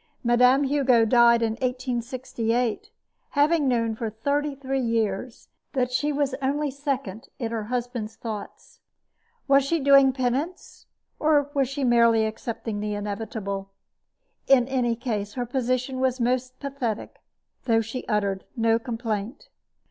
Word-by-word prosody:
Mme. 250 +3 +4
Hugo 265 -4 +3
died 235 0 +5
in 225 - +1
1868, 250 - -2 0.4
having 295 +1 +2
known 230 -3 +1
for 225 0 -3
thirty 285 +6 -1
three 270 0 -2
years 230 -1 -2 0.3
that 250 -2 0
she 290 +4 0
was 285 -2 0
only 285 +2 0
second 275 -7 -4
in 230 -3 -3
her 225 -2 -3
husband's 240 -2 -3
thoughts. 215 -3 -8 0.7
Was 275 0 +5
she 330 +5 0
doing 275 -1 +6
penance, 265 +7 -3 0.3
or 290 -2 +2
was 275 -3 +1
she 275 0 -3
merely 235 -2 +4
accepting 220 -1 -4
the 210 0 -2
inevitable? 205 -1 -4 0.8
In 255 -3 +5
any 245 -3 +1
case, 215 -4 -3
her 245 -1 -2
position 255 +1 -1
was 260 0 +1
most 255 +1 -1
pathetic, 265 -6 -4 0.4
though 225 -2 +3
she 225 +3 -6
uttered 200 -3 0
no 225 0 +3
complaint. 230 -1 -4
245 Hz, 135 wpm, -25 LUFS, 225-270 Hz, 0.8 s, doing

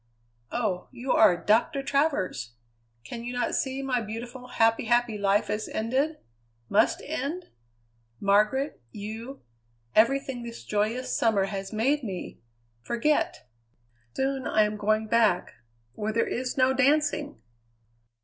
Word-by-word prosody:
Oh! 210 -7 -1
you 250 +2 -4
are 180 -5 +6
Doctor 230 +8 +2
Travers! 270 - 0 0.5
Can 230 - -7
you 245 +1 -4
not 245 -1 -1
see 270 0 -1
my 255 -3 0
beautiful, 235 +3 -7
happy, 225 -2 +2
happy 240 -1 +2
life 200 0 +2
is 210 +1 -2
ended 265 +8 0 0.5
must 215 +3 +3
end? 315 +4 -4 0.7
Margaret, 210 - +2
you, 225 +6 -7 0.5
everything 265 +2 +3
this 235 0 -8
joyous 215 +5 -1
summer 220 -4 +3
has 195 -1 -5
made 260 +7 +1
me 190 -5 -6 0.4
forget. 300 - 0 0.7
Soon 270 0 -1
I 215 - +4
am 210 0 -1
going 215 +1 +1
back 215 -5 +2 0.4
where 210 +6 -2
there 230 +1 +1
is 250 +2 -3
no 260 0 +4
dancing!" 285 - +1
235 Hz, 125 wpm, -27 LUFS, 210-265 Hz, 0.7 s, are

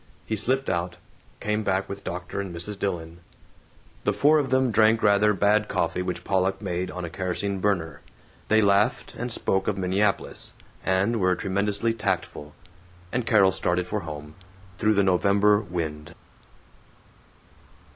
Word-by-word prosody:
He 110 - -2
slipped 130 +6 0
out, 85 +1 -2 0.4
came 105 +1 -1
back 95 -1 0
with 100 0 -7
Dr. 90 +2 -4
and 95 -2 -6
Mrs. 100 +4 -3
Dillon. 85 -3 -3 0.8
The - - +1
four 150 +2 +4
of 140 -3 -1
them 130 -1 +2
drank 110 +1 +4
rather 105 +1 +4
bad 105 +2 +2
coffee - - -1
which 90 0 -4
Pollock 95 0 0
made 90 -2 -3
on 90 -1 -5
a - - -6
kerosene 95 +2 -2
burner. 85 -7 -1 0.5
They 110 0 +4
laughed, 100 +1 +2
and 120 +1 -4
spoke 95 -3 0
of 105 - 0
Minneapolis, 95 +2 0 0.3
and 95 +5 +1
were 95 -1 +2
tremendously 100 +4 0
tactful; 95 -8 -3 0.6
and 120 -2 -2
Carol 100 -4 +5
started 90 -1 0
for 105 +4 -2
home, 75 -4 -8 0.5
through 110 -1 +3
the 100 - +4
November 100 +2 +3
wind. 80 -6 -5
100 Hz, 145 wpm, -25 LUFS, 90-105 Hz, 0.8 s, Carol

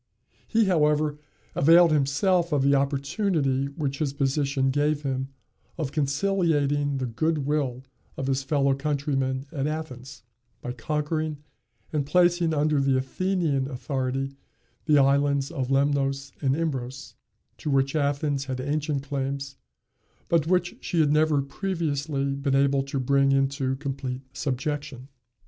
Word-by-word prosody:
He, 225 -1 +3
however, 150 -4 +2 0.3
availed 165 +3 +6
himself 165 +5 +2
of 145 -3 +2
the 140 +1 +4
opportunity 140 0 0
which 140 -1 -4
his 145 -3 -1
position 140 -1 +1
gave 145 +1 +1
him 135 -1 -2 0.5
of 155 -5 -3
conciliating 145 -2 +1
the 130 - -2
good 150 +5 -1
will 135 -4 -1 0.3
of 135 - -3
his 135 0 0
fellow 140 0 +2
countrymen 135 -2 -1
at 140 -3 -2
Athens, 130 -7 -6 0.4
by 125 - -5
conquering 150 +4 -2 0.6
and 150 -2 +1
placing 175 +2 +3
under 150 -1 +2
the 135 -1 +2
Athenian 145 -1 0
authority 135 0 -3 0.5
the 150 -2 +4
islands 140 0 +3
of 130 -2 -2
Lemnos 140 0 +1
and 135 -2 +2
Imbros, 135 -5 -4 0.5
to - - -4
which 135 +1 +1
Athens 145 -1 0
had 130 -1 -4
ancient 145 +1 -1
claims, 140 0 -4 0.7
but 165 -2 +2
which 180 0 +1
she 170 - -1
had 150 -2 +4
never 150 -2 +3
previously 145 -4 -2
been 140 0 0
able 140 0 +3
to 135 0 -3
bring 140 +1 +3
into 135 -1 +1
complete 135 -2 -4
subjection. 140 -1 -3
140 Hz, 130 wpm, -26 LUFS, 135-155 Hz, 0.7 s, availed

